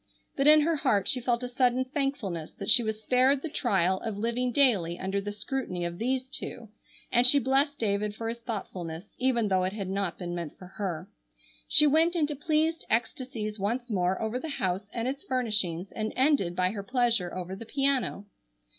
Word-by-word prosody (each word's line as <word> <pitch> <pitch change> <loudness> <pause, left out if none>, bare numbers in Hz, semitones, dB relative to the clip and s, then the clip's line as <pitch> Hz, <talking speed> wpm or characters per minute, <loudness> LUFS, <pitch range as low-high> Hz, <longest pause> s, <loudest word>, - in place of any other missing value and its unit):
But 275 +1 +2
in 305 0 +8
her 320 +1 +1
heart 215 -9 +1
she 255 - +1
felt 240 0 0
a - - -2
sudden 250 0 +1
thankfulness 255 - -3
that 200 - 0
she - - +7
was 220 -1 -3
spared 260 +4 +3
the 325 - -3
trial 190 - +1
of 220 -3 -4
living 235 +3 -1
daily 205 -11 +3
under 195 +2 -2
the 205 +1 -4
scrutiny 210 -4 -3
of 170 0 -5
these 255 +3 -1
two, 240 -4 -6 0.4
and 245 0 +6
she 285 - +7
blest 275 +2 +2
David 210 -1 -1
for 225 +1 -5
his 230 +1 -4
thoughtfulness, 190 -6 -6
even 245 -4 +2
though 185 -1 +2
it 185 +1 -1
had 200 -3 -4
not 195 -2 -2
been 175 -1 -5
meant 170 -4 -6
for 185 - -11
her. 185 -3 -5 0.6
She 300 - +6
went 320 +4 +3
into 300 -3 0
pleased 315 +3 0
ecstasies 225 -2 -2
once 235 +5 -2
more 185 -1 +1
over 220 +3 -2
the 320 - -6
house, 190 -6 -2
and 235 0 -3
its 275 +2 -4
furnishings, 210 -8 -1
and 215 0 -3
ended 260 - +2
by 185 0 +1
her 205 -1 -5
pleasure 235 -5 +1
over 185 +1 -5
the 225 +3 -10
piano. 270 -6 0
230 Hz, 195 wpm, -28 LUFS, 195-260 Hz, 0.6 s, in